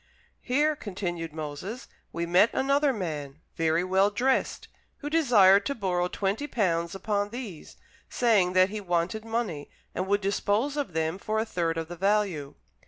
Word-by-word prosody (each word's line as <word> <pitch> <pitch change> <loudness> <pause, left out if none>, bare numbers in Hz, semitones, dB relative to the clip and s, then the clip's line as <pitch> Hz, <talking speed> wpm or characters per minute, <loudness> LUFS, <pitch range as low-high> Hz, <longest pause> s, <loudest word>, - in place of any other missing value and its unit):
"Here," 295 +4 +1
continued 175 - -5
Moses, 155 - -6 0.2
"we 170 0 -3
met 180 +6 +4
another 280 +1 +2
man, 155 - -5 0.2
very 165 +1 +1
well 190 +2 +3
dressed, 250 +6 0 0.3
who 295 0 -6
desired 215 -11 +5
to 280 - -2
borrow 180 -5 0
twenty 200 +10 -2
pounds 170 - 0
upon 205 +1 -1
these, 225 -8 -8 0.3
saying 210 -7 +2
that 185 +1 +5
he 215 0 -4
wanted 175 +4 -1
money 225 -10 -3 0.2
and 185 +2 -3
would 205 +1 +1
dispose 205 +7 0
of 285 - -3
them 160 +3 -1
for 215 +2 -2
a 220 - +1
third 170 -6 -1
of 165 -1 -3
the 175 - -7
value. 195 -6 0
195 Hz, 160 wpm, -27 LUFS, 170-225 Hz, 0.3 s, desired